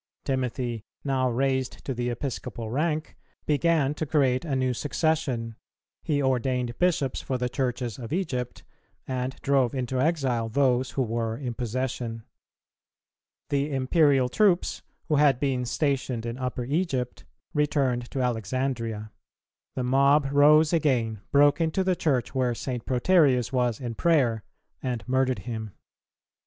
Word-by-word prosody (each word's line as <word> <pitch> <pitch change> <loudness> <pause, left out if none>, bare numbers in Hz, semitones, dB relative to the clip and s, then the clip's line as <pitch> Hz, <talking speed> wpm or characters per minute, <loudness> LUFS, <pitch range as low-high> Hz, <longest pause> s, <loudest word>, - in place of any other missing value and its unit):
[318:2] - - -46
Timothy, 125 -3 -2 0.2
now 130 -2 +1
raised 130 +1 -1
to 135 - -2
the 120 0 -2
Episcopal 120 -3 -5
rank, 155 +3 -1 0.3
began 150 -1 +2
to 155 +1 -4
create 135 -3 +2
a 150 -5 -2
new 130 -1 +1
succession; 135 -4 -1 0.5
he 145 -2 0
ordained 125 -2 0
Bishops 165 -7 +1
for 130 - -2
the 125 0 -1
Churches 125 -2 -2
of 115 -2 -7
Egypt, 135 -9 -3 0.4
and 130 0 -2
drove 135 -3 +2
into 130 0 -1
exile 130 -7 0
those 130 0 +2
who 135 - +1
were 115 -1 -2
in 125 -4 -4
possession. 120 -1 -3 1.3
The 145 +1 0
Imperial 135 0 +3
troops, 185 - +2 0.3
who 155 -3 +2
had 140 -3 +4
been 130 -3 0
stationed 130 -3 -1
in 115 +2 -4
Upper 125 -1 -3
Egypt, 135 -4 -2 0.3
returned 135 -5 0
to 135 - -2
Alexandria; 115 -2 -2 0.6
the 130 - -1
mob 140 +3 +3
rose 150 +3 +5
again, 120 -10 +1
broke 145 +3 +5
into 165 +4 +1
the 185 -1 +1
Church, 135 -8 0
where 125 -3 +1
St. 125 -1 -5
Proterius 130 -3 +3
was 125 -3 +1
in 120 -3 -4
prayer, 125 -7 +2 0.4
and 120 -5 -3
murdered 130 0 +1
him. 110 -4 -5
130 Hz, 140 wpm, -26 LUFS, 120-145 Hz, 1.3 s, rose